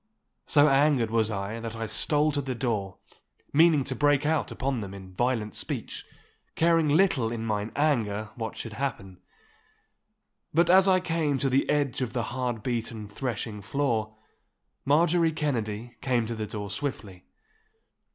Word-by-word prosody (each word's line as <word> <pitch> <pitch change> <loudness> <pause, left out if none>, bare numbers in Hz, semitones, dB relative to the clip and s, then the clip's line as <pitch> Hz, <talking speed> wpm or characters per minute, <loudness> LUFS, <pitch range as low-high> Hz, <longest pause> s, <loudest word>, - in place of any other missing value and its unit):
So 145 -1 +5
angered 135 -5 +3
was 110 -1 +2
I 100 +2 -4
that 115 0 -6
I 115 0 -3
stole 150 +8 +2
to 145 -1 0
the 130 -2 -4
door, 110 -6 -2 0.6
meaning 155 -1 +5
to - - -2
break 145 0 +2
out 155 0 +1
upon 135 -3 -2
them 100 -1 -7
in 95 -1 -11
violent 115 -1 -1
speech, - - -4 0.5
caring 165 -1 +3
little 145 -8 +3
in 115 -1 -4
mine 105 0 -2
anger 110 -8 0
what 115 -1 -5
should 115 - -6
happen. 100 -8 -4 1.4
But 170 +1 +4
as 190 +1 +6
I 185 -1 +4
came 160 -5 0
to 135 0 0
the 135 +2 +2
edge 140 -3 0
of 125 - -2
the 120 - -1
hard 120 -4 -2
beaten 115 -3 -3
threshing 105 -1 -4
floor, 110 -2 -1 0.7
Marjorie 165 +3 +3
Kennedy 120 -6 -3
came 125 -3 +1
to 115 - -3
the 110 -1 -4
door 105 -1 -5
swiftly. 105 -6 -5
120 Hz, 155 wpm, -27 LUFS, 110-145 Hz, 1.4 s, as